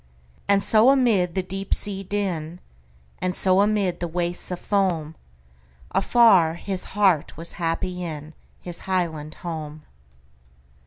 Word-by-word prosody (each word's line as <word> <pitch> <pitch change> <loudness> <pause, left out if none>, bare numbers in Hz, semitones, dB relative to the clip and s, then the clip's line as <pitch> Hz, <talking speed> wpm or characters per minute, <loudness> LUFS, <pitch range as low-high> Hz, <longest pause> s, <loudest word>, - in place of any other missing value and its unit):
And 200 0 +3
so 220 +3 +5
amid 225 -11 +3
the 190 - 0
deep 195 +1 -2
sea 195 -1 -3
din, 180 -4 -3 0.6
And 185 0 -2
so 190 0 +4
amid 205 -3 +1
the 175 - -2
wastes 175 +1 -2
of 180 -1 -4
foam, 180 -6 0 0.8
Afar 190 -5 +4
his 185 +1 -5
heart 185 -10 +2
was 165 +1 -7
happy 175 +2 -1
inHis 165 +1 -7
highland 160 -5 -2
home! 155 -2 -6
180 Hz, 120 wpm, -23 LUFS, 165-195 Hz, 0.8 s, so